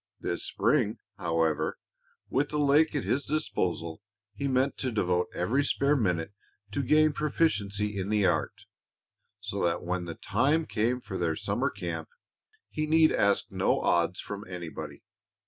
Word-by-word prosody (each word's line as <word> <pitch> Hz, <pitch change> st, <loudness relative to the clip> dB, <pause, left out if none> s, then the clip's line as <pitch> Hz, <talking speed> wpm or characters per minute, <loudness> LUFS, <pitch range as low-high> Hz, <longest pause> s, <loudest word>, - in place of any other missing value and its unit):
This -, -, -2 dB
spring, -, -, +1 dB, 0.2 s
however, 80 Hz, -1 st, 0 dB, 0.5 s
with 140 Hz, +2 st, 0 dB
the 150 Hz, -, -2 dB
lake 150 Hz, +2 st, +4 dB
at 145 Hz, -, 0 dB
his 140 Hz, +2 st, 0 dB
disposal, 85 Hz, -, -2 dB, 0.3 s
he 140 Hz, +7 st, -3 dB
meant 130 Hz, +1 st, +1 dB
to 130 Hz, -, -1 dB
devote 90 Hz, -5 st, +1 dB
every 115 Hz, +11 st, +1 dB
spare 140 Hz, +1 st, +2 dB
minute 90 Hz, -, 0 dB, 0.4 s
to 140 Hz, -, -1 dB
gaining 155 Hz, +3 st, +4 dB
proficiency 105 Hz, -10 st, 0 dB
in 95 Hz, +1 st, -3 dB
the 105 Hz, -2 st, +2 dB
art, -, -, 0 dB, 0.8 s
so -, -, -3 dB
that 85 Hz, -1 st, 0 dB
when 90 Hz, 0 st, -2 dB
the 85 Hz, -1 st, -6 dB
time 145 Hz, +9 st, +1 dB
came 120 Hz, +1 st, 0 dB
for -, -, -6 dB
their -, -, 0 dB
summer -, -, -1 dB
camp -, -, -5 dB, 0.6 s
he 155 Hz, 0 st, -2 dB
need 160 Hz, 0 st, +5 dB
ask 100 Hz, 0 st, +2 dB
no -, -, +1 dB
odds 85 Hz, +1 st, +1 dB
from 100 Hz, 0 st, -6 dB
anybody. 90 Hz, -3 st, -7 dB
105 Hz, 150 wpm, -29 LUFS, 90-145 Hz, 0.8 s, need